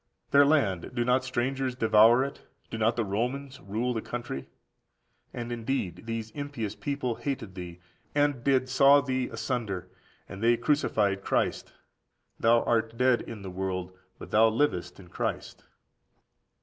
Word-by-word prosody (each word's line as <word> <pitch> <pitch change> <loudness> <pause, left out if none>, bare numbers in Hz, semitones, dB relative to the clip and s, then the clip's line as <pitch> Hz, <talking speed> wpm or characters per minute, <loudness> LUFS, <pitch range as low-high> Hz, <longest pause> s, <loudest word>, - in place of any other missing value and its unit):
Their 140 0 +6
land, 110 - +1
do 120 -1 0
not 125 +1 +3
strangers 130 +1 -1
devour 115 +1 +5
it? 140 +1 -6 0.3
Do 115 - -4
not 110 +2 +2
the 115 - 0
Romans 130 +7 -3
rule 115 +5 -2
the 110 - -2
country? 120 - -5 0.8
And 120 -1 -5
indeed 115 -4 -3
these 115 -1 -4
impious 140 -7 -4
people 140 -1 -2
hated 120 -6 -4
thee, 90 -2 -8 0.4
and 145 -4 +1
did 130 -2 +2
saw 140 +2 +6
thee 130 -2 -1
asunder, 100 -8 -3 0.4
and 100 - -9
they 120 +1 +4
crucified 105 -10 +1
Christ. - - -1 0.7
Thou 115 +1 +4
art 115 0 0
dead 125 -1 +3
in 110 -3 -8
the 95 - -6
world, 95 0 -4 0.2
but - - -10
thou 110 +1 +6
livest 105 -8 0
in 95 - -13
Christ. - - -4
120 Hz, 150 wpm, -28 LUFS, 105-130 Hz, 0.8 s, Their